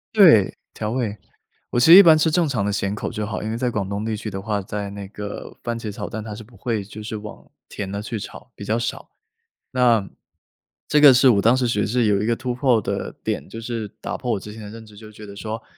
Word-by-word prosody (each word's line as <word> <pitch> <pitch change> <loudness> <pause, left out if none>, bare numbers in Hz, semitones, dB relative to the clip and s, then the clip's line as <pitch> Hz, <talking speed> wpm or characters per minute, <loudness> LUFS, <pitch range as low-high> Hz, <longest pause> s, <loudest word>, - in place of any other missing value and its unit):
对， 155 - +6 0.2
调 110 0 -4
味。 115 -4 -2 0.5
我 120 - 0
其 120 - +4
实 - - +12
一 200 - +11
般 160 -2 +7
吃 155 +1 +2
正 170 +2 +2
常 110 -7 -1
的 - - 0
咸 100 0 -1
口 105 - -4
就 105 - -4
好， 110 - -4
因 110 - -4
为 115 - -2
在 125 +1 0
广 100 -3 -2
东 100 +1 -3
地 110 -1 -2
区 110 - -5
的 95 -1 -5
话， 105 0 -2
在 100 +1 -5
那 100 0 -8
个 105 0 -8
番 120 -1 -3
茄 110 - -5
炒 100 - -6
蛋， 110 - -5
它 105 -1 -7
是 110 - -9
不 115 0 -19
会 110 0 -2
就 105 +2 -10
是 110 +1 -5
往 105 0 -11 0.2
甜 100 - -5
的 100 +1 -4
去 110 +1 -5
炒， - - -10
比 100 - -9
较 110 +3 0
少。 120 - -4 0.6
那， 120 -5 +3 0.8
这 150 - +3
个 145 -2 +10
是 130 +1 +6
我 105 -5 +4
当 115 +5 +4
时 130 -2 +1
其 120 - 0
实 - - 0
是 120 +1 +1
有 100 -1 +2
一 110 - -1
个 115 - +2
突 125 +1 -3
破 125 -2 +2
的 - - -4
点， - - -3
就 115 - -8
是 115 -2 -4
打 - - -4
破 125 -2 -2
我 - - -1
之 105 +2 -10
前 110 - -10
的 105 - -8
认 110 +1 -10
知， 105 -1 -16
就 110 +1 -12
觉 105 0 -12
得 100 -1 -10
说， 110 +2 -6
110 Hz, 295 characters per minute, -22 LUFS, 105-120 Hz, 0.8 s, 实